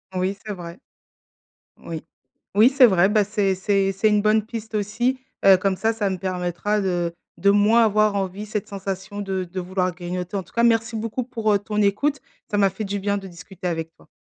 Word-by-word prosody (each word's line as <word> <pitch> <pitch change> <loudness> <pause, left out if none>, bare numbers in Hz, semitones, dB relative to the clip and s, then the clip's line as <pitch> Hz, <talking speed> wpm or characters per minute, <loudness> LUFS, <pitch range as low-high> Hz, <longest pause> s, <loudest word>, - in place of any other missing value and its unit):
Oui, 185 +2 -1
c'est 210 - -4
vrai, 175 -1 -9 1.0
oui. 160 -2 -7 0.5
Oui, 220 +5 +7
c'est 270 -2 +6
vrai, 190 -3 +4
bah, 210 -1 +3
c'est 200 -2 0
c'est 195 0 +1
c'est 215 +3 +2
une 210 -1 +3
bonne 215 0 +2
piste 220 -1 -7
aussi, 230 +6 0 0.3
heu, 195 -1 +9
comme 190 +1 0
ça, 225 +3 +1
ça 210 -3 -1
me 190 - -2
permettra 185 +3 -1
de 175 -3 -1 0.2
de 200 - +3
moins 215 +3 +5
avoir 215 -1 +2
envie, 195 +1 -3
cette 210 -1 -4
sensation 195 0 -5
de 190 -2 -2
de 185 +2 -6
vouloir 185 0 -1
grignoter. 180 +1 -5
En 190 - -3
tout - - -23
cas, 235 - +1
merci 225 -1 +2
beaucoup 230 +3 -3
pour, 225 -4 0
heu, 200 - +3
ton 210 +1 -2
écoute, 270 +9 +1 0.3
ça 205 - -1
m'a 195 -1 +4
fait 195 +4 -6
du 200 0 -3
bien 200 +1 0
de 195 - -7
discuter 180 +1 -8
avec 165 -1 -3
toi. - - -22
200 Hz, 210 wpm, -23 LUFS, 185-215 Hz, 1.0 s, heu